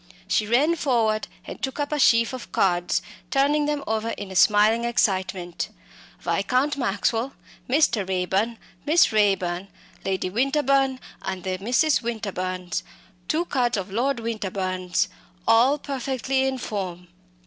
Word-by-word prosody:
She 215 Hz, -, +1 dB
ran 280 Hz, +9 st, +3 dB
forward 225 Hz, -7 st, +1 dB, 0.2 s
and -, -, -8 dB
took 265 Hz, +2 st, -3 dB
up 290 Hz, 0 st, -1 dB
a 300 Hz, -, 0 dB
sheaf 230 Hz, -1 st, +4 dB
of 255 Hz, -2 st, -7 dB
cards, 175 Hz, -2 st, +1 dB, 0.3 s
turning 290 Hz, +2 st, +2 dB
them 295 Hz, -1 st, -1 dB
over 220 Hz, +1 st, -1 dB
in 200 Hz, -3 st, -6 dB
a -, -, -7 dB
smiling 210 Hz, +4 st, +5 dB
excitement. 190 Hz, -6 st, 0 dB, 0.5 s
"Viscount 275 Hz, +4 st, +1 dB
Maxwell," 235 Hz, +1 st, 0 dB, 0.4 s
"Mr. 250 Hz, -6 st, +3 dB
Raeburn," 190 Hz, +5 st, 0 dB, 0.3 s
"Miss 315 Hz, +3 st, +4 dB
Raeburn," 195 Hz, -4 st, +1 dB, 0.4 s
"Lady 190 Hz, -1 st, -1 dB
Winterbourne 270 Hz, +2 st, +2 dB, 0.2 s
and 190 Hz, -2 st, -4 dB
the 185 Hz, -1 st, -2 dB
Misses 250 Hz, +9 st, +2 dB
Winterbourne," 185 Hz, -6 st, -4 dB, 0.6 s
two 330 Hz, +3 st, +1 dB
cards 245 Hz, -7 st, 0 dB
of 195 Hz, 0 st, -4 dB
Lord 245 Hz, +4 st, 0 dB
Winterbourne's 190 Hz, -5 st, -1 dB, 0.4 s
all 240 Hz, +6 st, +5 dB
perfectly 265 Hz, -1 st, -1 dB
in 265 Hz, 0 st, -1 dB
form. 185 Hz, -6 st, -5 dB
230 Hz, 130 wpm, -24 LUFS, 190-265 Hz, 0.6 s, smiling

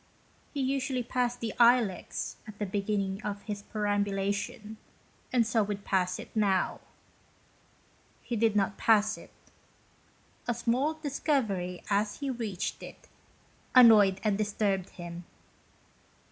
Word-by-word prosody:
He 285 Hz, -, -3 dB
usually 265 Hz, -1 st, -1 dB
passed 245 Hz, 0 st, -1 dB
the 225 Hz, -2 st, -3 dB
Ilex 235 Hz, -6 st, +2 dB
at 210 Hz, -1 st, -10 dB
the 210 Hz, -, -2 dB
beginning 200 Hz, 0 st, -2 dB
of 205 Hz, -1 st, -5 dB
his 205 Hz, -2 st, -5 dB
perambu 205 Hz, -1 st, -1 dB
lation, 205 Hz, +2 st, -3 dB, 0.5 s
and 240 Hz, -2 st, +3 dB
so 220 Hz, +1 st, +2 dB
would 205 Hz, -1 st, -3 dB
pass 185 Hz, -2 st, +1 dB
it -, -, -11 dB
now. 200 Hz, -4 st, +1 dB, 1.4 s
He 240 Hz, -, -3 dB
did 225 Hz, -1 st, +2 dB
not 195 Hz, -1 st, +1 dB
pass 215 Hz, -1 st, +4 dB
it. -, -, -13 dB, 1.2 s
A 240 Hz, -, 0 dB
small 250 Hz, +7 st, 0 dB
discovery, 260 Hz, -, -1 dB
as 205 Hz, +1 st, +1 dB
he 280 Hz, -2 st, -2 dB
reached 220 Hz, -7 st, -4 dB
it, -, -, -12 dB, 0.7 s
annoyed 210 Hz, -6 st, +7 dB
and 210 Hz, -2 st, +1 dB
disturbed 200 Hz, -3 st, 0 dB
him. 175 Hz, 0 st, -8 dB
210 Hz, 125 wpm, -29 LUFS, 200-240 Hz, 1.4 s, annoyed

